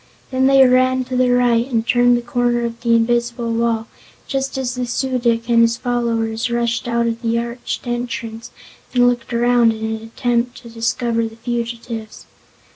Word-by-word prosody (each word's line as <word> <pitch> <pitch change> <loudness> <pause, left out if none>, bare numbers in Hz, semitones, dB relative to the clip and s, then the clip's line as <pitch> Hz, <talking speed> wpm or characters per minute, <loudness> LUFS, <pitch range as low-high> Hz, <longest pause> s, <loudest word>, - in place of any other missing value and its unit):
Then 260 0 +2
they 270 -1 +6
ran 255 +1 +3
to 255 0 -5
the 250 0 +3
right 245 0 +2
and 225 -2 0
turned 245 0 +4
the 240 - -4
corner 240 0 0
of 235 0 -6
the 235 -1 +3
invisible 235 0 0
wall 230 -1 0 0.4
just 270 -1 -2
as 255 -2 -2
the 250 -1 -3
Su 260 +1 -1
dic 230 -1 0
and 235 -1 +4
his 230 0 +3
followers 230 -1 -1
rushed 235 0 -1
out 235 0 +1
of 230 0 -2
the 230 -1 0
arched 235 +2 -4
entrance 240 -1 -4 0.5
and 245 0 +5
looked 245 0 -1
around 240 -1 +3
in 220 0 -5
an 220 0 -3
attempt 240 +1 -1
to 235 - -11
discover 230 0 -1
the 225 - -12
fugitives. 235 -1 -5
235 Hz, 180 wpm, -19 LUFS, 230-245 Hz, 0.5 s, they